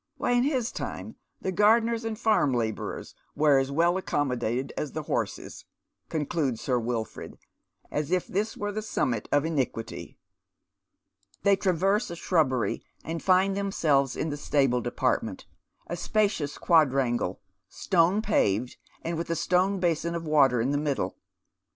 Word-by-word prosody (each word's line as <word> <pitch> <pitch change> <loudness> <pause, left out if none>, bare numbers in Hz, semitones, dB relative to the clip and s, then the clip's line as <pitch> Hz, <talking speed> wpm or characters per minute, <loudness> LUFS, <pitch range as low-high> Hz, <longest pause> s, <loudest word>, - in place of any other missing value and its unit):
Why, - - 0
in 245 0 +4
his 260 -5 0
time - - -6 0.3
the 190 - -2
gardeners 225 +4 +3
and 225 -1 -3
fai 220 -1 +3
m 135 - +2
labourers 110 -2 -3 0.2
were 145 -3 +4
as 135 +1 -1
well 170 +5 +2
accommodated 130 -7 -1
as 150 - -4
the 155 - -4
horses," - - -3 0.4
concludes 145 -5 -1
Sir 125 -2 0
Wilford, 115 -1 -4 0.5
as 150 -1 -2
if 185 -1 +1
this 210 +3 -2
were 205 0 -2
the 215 +1 -3
summit 125 - -2
of 145 +1 +3
iniquity. 135 -8 -3 1.3
They 200 -1 +5
traverse 195 +4 +1
a 170 - -5
shrubbery, 150 -8 0 0.2
and 165 +1 -4
find 190 +1 +3
themselves 155 -9 +1
in 160 - -2
the 145 - -4
stable 135 -4 +1
department, - - -1 0.4
a 175 - -4
spacious 185 -6 0
quadrangle, 135 - +2 0.3
stone 185 +3 +2
paved, 110 - +1 0.3
with 165 0 -3
a 165 - 0
stone 185 +4 +1
basin 170 -1 0
of 165 -1 -4
water 140 -5 +4
in 125 +5 +1
the 145 - +1
middle. 145 -2 -2
160 Hz, 145 wpm, -27 LUFS, 135-195 Hz, 1.3 s, They